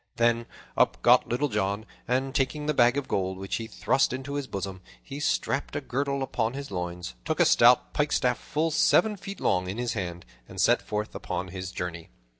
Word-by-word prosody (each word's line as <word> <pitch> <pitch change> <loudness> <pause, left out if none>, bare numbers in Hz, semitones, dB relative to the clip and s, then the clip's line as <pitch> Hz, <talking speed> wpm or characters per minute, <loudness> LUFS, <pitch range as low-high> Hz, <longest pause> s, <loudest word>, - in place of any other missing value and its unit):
Then 115 0 +2 0.3
up - - +2
got 125 +1 +6
Little 125 +5 +1
John, 105 -2 -1 0.2
and, 130 +2 0
taking 145 +1 0
the 150 - +1
bag 120 0 +4
of 140 - -2
gold, 95 -1 -1
which 95 0 -3
he 115 - -5
thrust 135 +3 +1
into 135 +2 -5
his 145 -2 -3
bosom, 95 -2 -5 0.2
he 140 0 -8
strapped 145 -1 -1
a - - +1
girdle 140 0 -2
about 120 -2 -1
his 140 -5 -6
loins, 90 -6 -4
took - - -2
a - - +6
stout - - +5
pikestaff - - +1
full 160 +2 -1
seven 195 +6 +4
feet 195 +1 -8
long 90 0 +1
in 100 - -4
his 120 -1 -1
hand, 90 - -4 0.2
and - - -8
set - - +4
forth 105 0 -4
upon 90 0 -4
his 95 0 -6
journey. 85 -2 -5
120 Hz, 200 wpm, -27 LUFS, 95-140 Hz, 0.3 s, got